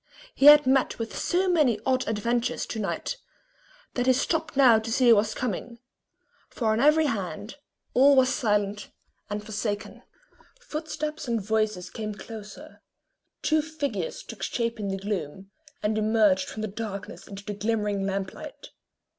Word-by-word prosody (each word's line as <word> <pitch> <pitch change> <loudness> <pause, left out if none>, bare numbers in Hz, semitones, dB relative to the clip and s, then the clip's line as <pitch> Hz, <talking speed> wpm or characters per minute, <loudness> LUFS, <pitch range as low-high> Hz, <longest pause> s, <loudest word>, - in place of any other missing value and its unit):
He 275 - +4
had 295 -1 +10
met 265 0 +2
with 230 -1 -5
so 365 +2 0
many 300 - +3
odd 260 -1 +1
ad 220 - -1
ventures 235 +3 -1
to 220 - -5
night 215 - -3 0.8
that 245 0 -1
he 260 - +6
stopped 320 +3 -1
now 245 -5 +7
to 225 +1 -6
see 250 0 +4
who 230 - +9
was 215 +1 +1
coming; 235 0 -4 0.7
for 225 -3 -1
on 220 - +1
every 305 +4 +5
hand 205 - -4 0.4
all 275 +2 +6
was 260 -1 +5
silent 205 -3 0 0.4
and 210 0 -4
forsaken. 210 0 -4 0.6
Footsteps 305 - -5
and 235 -1 0
voices 215 -3 -1
came 215 -2 -5
closer; 210 0 -10 0.6
two 310 0 +3
figures 315 - -4
took - - -10
shape 230 -1 -2
in 205 - -3
the 195 0 -2
gloom, 195 -1 -5 0.3
and 210 +1 +1
emerged 210 -4 +3
from 215 - -6
the - - -1
darkness 205 -1 -7
into 200 0 -9
the 210 - -4
glimmering 210 -1 -1
lamp 195 -1 -3
light. - - -10
220 Hz, 160 wpm, -26 LUFS, 205-265 Hz, 0.8 s, had